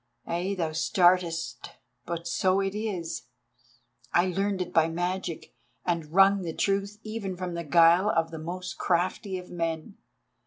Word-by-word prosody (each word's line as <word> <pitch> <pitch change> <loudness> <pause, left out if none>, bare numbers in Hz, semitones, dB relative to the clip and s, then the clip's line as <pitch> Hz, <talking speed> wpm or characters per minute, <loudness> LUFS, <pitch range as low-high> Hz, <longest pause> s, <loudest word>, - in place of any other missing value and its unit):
Ay, 180 +4 -2
thou 165 -3 -1
startest, 165 - +1 0.3
but 170 0 -4
so 185 +2 +2
it 195 0 -1
is. 180 - -4 0.8
I 175 - +4
learned 195 +2 0
it 180 - -12
by 160 -1 +5
my 165 - -5
magic, 175 -1 -3 0.3
and 165 -3 -1
wrung 195 +2 +5
the 165 -3 -4
truth 200 +1 0
even 215 -4 -4
from 180 -1 -4
the 170 0 -3
guile 170 +5 +5
of 165 -3 +1
the 160 - -6
most 180 +3 -6
crafty 185 +2 0
of 180 0 -10
men. 165 +2 -3
175 Hz, 155 wpm, -28 LUFS, 165-195 Hz, 0.8 s, by